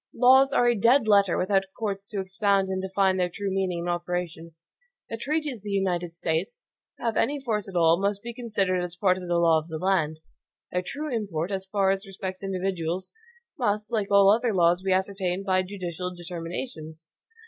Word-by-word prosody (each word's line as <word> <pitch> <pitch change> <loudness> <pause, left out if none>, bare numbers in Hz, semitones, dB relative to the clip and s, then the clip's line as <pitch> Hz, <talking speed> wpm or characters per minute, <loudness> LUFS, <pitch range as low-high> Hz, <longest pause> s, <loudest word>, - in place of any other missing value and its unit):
Laws 265 +2 +6
are 245 -3 +3
a 240 - +5
dead 235 +3 +3
letter 200 -3 +4
without 195 +1 +1
courts 200 -2 -3
to 205 - -3
expound 195 0 +1
and 190 0 -2
define 190 0 +1
their 180 -1 +1
true 195 +2 -4
meaning 185 -3 -1
and 175 - -3
operation. 175 -2 -4 0.6
The 230 - -3
treaties 295 +1 -2
of - - -20
the 205 - -7
United 180 -4 -1
States, 170 +7 -2 0.3
to - - -13
have 230 -2 0
any 290 +1 +1
force 215 -6 -2
at 190 - -10
all, 165 +1 +4
must 200 0 -1
be 235 0 -6
considered 200 -6 -1
as 175 -1 -5
part 185 0 +2
of 180 - -8
the 175 0 +1
law 165 -2 +4
of 155 - -11
the 160 -1 -5
land. 160 -4 0 0.5
Their 180 - 0
true 290 +7 -4
import, 195 -6 -2
as 190 -1 -3
far 195 -1 +2
as 195 +1 -3
respects 190 -1 -6
individuals, 185 -2 -3 0.5
must, 210 -1 -1
like 215 -4 -1
all 200 0 +6
other 230 0 +1
laws, 175 0 +3
be 190 0 -1
ascertained 190 0 -1
by 185 -1 +2
judicial 180 -2 -5
determinations. 165 -1 -7
190 Hz, 195 wpm, -26 LUFS, 175-205 Hz, 0.6 s, Laws